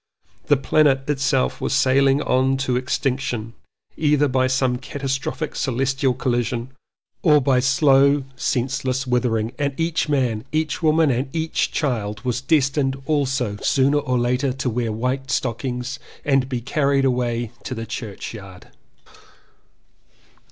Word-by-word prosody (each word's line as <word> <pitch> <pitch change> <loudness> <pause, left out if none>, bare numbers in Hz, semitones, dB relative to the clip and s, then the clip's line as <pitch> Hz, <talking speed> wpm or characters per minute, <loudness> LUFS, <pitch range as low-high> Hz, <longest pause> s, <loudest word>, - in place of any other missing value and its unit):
The 145 - +4
planet 135 -1 +2
itself 135 -2 0
was - - -1
sailing 135 +1 +3
on 130 +1 +2
to 125 - 0
extinction 125 -3 -2 0.4
either 150 -1 +2
by 130 -1 +1
some 130 -1 +1
catastrophic 135 +3 -4
celestial 135 0 0
collision 120 0 -1 0.5
or 150 -4 +5
by 130 -2 +2
slow 135 +2 +4
senseless 130 +1 -1
withering, 120 -3 0
and 140 0 -2
each 165 -1 0
man, 125 -7 0
each 155 +1 -1
woman 160 -2 +3
and 130 +3 -1
each 160 0 -1
child 110 -6 -2
was 125 0 -1
destined 135 -2 +1
also 135 -7 0
sooner 140 +2 +3
or 130 -3 -1
later 125 +3 +1
to 130 -1 -2
wear 115 -1 -1
white 130 +4 -2
stockings 125 +2 -2 0.3
and 135 -2 +2
be 125 -3 -2
carried 140 +1 +1
away 120 -3 0
to 130 - -5
the 115 0 -5
church 110 -3 -6
yard. 100 -4 -11
130 Hz, 130 wpm, -22 LUFS, 125-140 Hz, 0.5 s, or